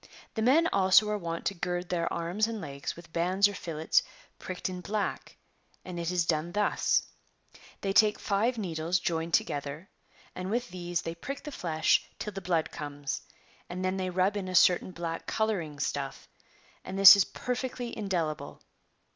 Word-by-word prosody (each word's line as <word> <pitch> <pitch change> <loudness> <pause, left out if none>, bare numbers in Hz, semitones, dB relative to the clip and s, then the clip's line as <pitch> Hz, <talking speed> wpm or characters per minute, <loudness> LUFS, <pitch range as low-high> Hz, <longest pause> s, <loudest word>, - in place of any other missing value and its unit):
[The 220 - -2
men 285 +9 +5
also 195 +2 +5
are 210 - 0
wont 165 -2 -4
to - - +1
gird 175 0 -3
their 170 -2 -1
arms 175 +6 0
and 230 -1 -4
legs 140 -5 -5
with 165 -1 -14
bands 185 +4 +3
or 205 - -5
fillets 160 -4 +1 0.4
pricked 185 -1 -4
in 180 -1 -5
black, 205 +2 -3 0.5
and 180 -2 -6
it 170 0 -2
is 180 -2 +1
done 165 +1 -1
thus; 210 0 +2 0.8
they 195 -1 -1
take 215 0 +5
five 220 +5 0
needles 170 -3 -1
joined 165 -2 0
together, 145 +5 -3 0.4
and 185 +1 -5
with 240 +3 -1
these 175 -1 -3
they 165 - -4
prick 275 +12 -7
the 295 - -6
flesh 160 - +2
till 210 - -5
the 195 - -5
blood 175 -3 0
comes, 145 -1 -5 0.5
and 185 +1 -4
then 185 +1 0
they 185 -1 -1
rub 185 +3 +1
in 195 -2 -3
a 185 - -3
certain 180 +1 +5
black 170 -2 -5
colouring 195 -9 -1
stuff, 140 -1 -3 0.6
and 190 - -6
this 195 0 +12
is 200 - +4
perfectly 250 +1 -4
indelible. 175 -7 -3
180 Hz, 170 wpm, -29 LUFS, 165-205 Hz, 0.8 s, this